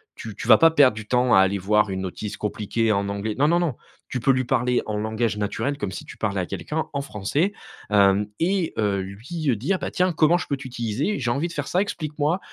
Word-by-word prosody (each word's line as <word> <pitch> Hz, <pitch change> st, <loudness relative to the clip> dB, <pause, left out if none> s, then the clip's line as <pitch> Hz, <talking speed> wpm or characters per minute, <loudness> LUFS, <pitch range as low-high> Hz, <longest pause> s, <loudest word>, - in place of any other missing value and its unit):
tu 110 Hz, -3 st, -8 dB
tu -, -, -7 dB
vas 110 Hz, -, +9 dB
pas 165 Hz, -, +6 dB
perdre 140 Hz, -8 st, +5 dB
du 110 Hz, -1 st, -8 dB
temps 125 Hz, +1 st, +2 dB
à -, -, +7 dB
aller 95 Hz, +1 st, +3 dB
voir 105 Hz, +2 st, +2 dB
une 95 Hz, -1 st, -3 dB
notice 100 Hz, +3 st, -5 dB
compliquée 110 Hz, +2 st, -1 dB
en 100 Hz, -1 st, 0 dB
anglais. 100 Hz, +2 st, -3 dB
Non, 145 Hz, -, +4 dB
non, 170 Hz, +2 st, +3 dB
non, 165 Hz, -8 st, -1 dB, 0.3 s
tu 125 Hz, -, -2 dB
peux 125 Hz, -, +3 dB
lui 130 Hz, -1 st, +1 dB
parler 125 Hz, 0 st, +1 dB
en 105 Hz, -1 st, -3 dB
langage 110 Hz, 0 st, -1 dB
naturel, 105 Hz, +7 st, -2 dB
comme 100 Hz, -7 st, -3 dB
si -, -, -6 dB
tu -, -, -12 dB
parlais 100 Hz, -3 st, -1 dB
à -, -, -2 dB
quelqu'un 155 Hz, -, -4 dB
en 140 Hz, -, -2 dB
français, 140 Hz, -, -1 dB, 0.4 s
hem, 100 Hz, 0 st, +4 dB
et, 180 Hz, 0 st, +1 dB
heu, 100 Hz, -2 st, +1 dB
lui 120 Hz, -, -5 dB
heu, 125 Hz, -, +3 dB
dire: 175 Hz, -, -1 dB
«Bah, -, -, -4 dB
tiens 180 Hz, 0 st, +1 dB
comment 165 Hz, +1 st, +3 dB
je -, -, -5 dB
peux 140 Hz, -, -1 dB
t'utiliser? 130 Hz, -, -2 dB
J'ai 120 Hz, -3 st, 0 dB
envie 140 Hz, +7 st, 0 dB
de 170 Hz, -, -9 dB
faire 145 Hz, -3 st, -4 dB
ça, 180 Hz, -, +1 dB
explique-moi, 155 Hz, -3 st, -1 dB
120 Hz, 245 wpm, -24 LUFS, 105-150 Hz, 0.4 s, vas